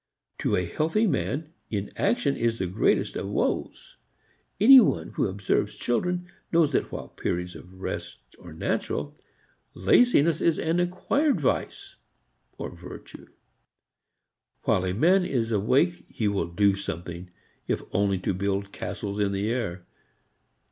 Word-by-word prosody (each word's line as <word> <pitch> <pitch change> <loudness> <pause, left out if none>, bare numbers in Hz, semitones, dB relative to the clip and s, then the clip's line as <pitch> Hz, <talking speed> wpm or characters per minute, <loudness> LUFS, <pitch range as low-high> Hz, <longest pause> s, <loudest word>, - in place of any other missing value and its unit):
To - - +1
a 90 - 0
healthy 160 - +1
man 160 -5 -1 0.2
inaction 135 - 0
is 115 -1 0
the 95 - -1
greatest 90 +4 +1
of - - -3
woes. - - -2 0.6
Any 260 +6 +10
one 85 - +1
who - - 0
observes 95 +1 -1
children 180 +8 -1 0.3
knows 165 -3 +4
that - - 0
while - - -6
periods 90 0 -3
of 90 - -12
rest 60 -9 -6
are - - -11
natural, - - -2 0.6
laziness 160 - +4
is 165 - +3
an 165 +2 0
acquired 185 - +1
vice 140 - -2 0.6
or - - -5
virtue. - - -11 1.4
While 95 - +2
a 90 - -1
man 180 - +4
is 120 -9 -1
awake 130 - +2
he 115 -6 -1
will 100 -1 0
do 100 +3 +3
something, 85 -1 -6 0.4
if - - -1
only 100 0 +1
to 95 - 0
build 100 +1 -2
castles 100 0 -5
in 100 -1 +1
the 100 +3 -1
air. 95 -8 -3
105 Hz, 135 wpm, -26 LUFS, -, 1.4 s, Any